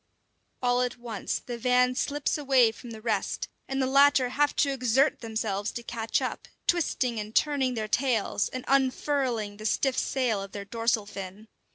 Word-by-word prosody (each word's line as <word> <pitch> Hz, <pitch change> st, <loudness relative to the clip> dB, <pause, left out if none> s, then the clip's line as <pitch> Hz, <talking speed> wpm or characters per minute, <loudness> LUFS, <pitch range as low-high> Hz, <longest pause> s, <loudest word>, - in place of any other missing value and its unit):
All 245 Hz, 0 st, +3 dB
at 250 Hz, -1 st, -1 dB
once 235 Hz, -4 st, -3 dB
the 240 Hz, -1 st, -5 dB
van 250 Hz, +1 st, +3 dB
slips 285 Hz, +3 st, -1 dB
away 265 Hz, -6 st, +4 dB
from 235 Hz, +2 st, -12 dB
the 220 Hz, -1 st, -9 dB
rest, 225 Hz, -2 st, -1 dB, 0.2 s
and 270 Hz, 0 st, -2 dB
the 265 Hz, -, +2 dB
latter 275 Hz, -1 st, +5 dB
have 290 Hz, +3 st, +1 dB
to 280 Hz, -, +2 dB
exert 265 Hz, +2 st, +2 dB
themselves 220 Hz, -3 st, -2 dB
to 240 Hz, -, -6 dB
catch 225 Hz, -1 st, -1 dB
up, -, -, -4 dB, 0.2 s
twisting 255 Hz, -9 st, +1 dB
and 210 Hz, +1 st, -7 dB
turning 270 Hz, -4 st, +2 dB
their 215 Hz, -1 st, -2 dB
tails, 235 Hz, -3 st, +1 dB
and 255 Hz, -1 st, -6 dB
unfurling 260 Hz, -5 st, +1 dB
the 215 Hz, -, -9 dB
stiff 265 Hz, +4 st, +1 dB
sail 245 Hz, -7 st, 0 dB
of 195 Hz, 0 st, -8 dB
their 200 Hz, -1 st, -6 dB
dorsal 230 Hz, 0 st, 0 dB
fin. 200 Hz, +2 st, -8 dB
245 Hz, 175 wpm, -27 LUFS, 220-265 Hz, 0.2 s, latter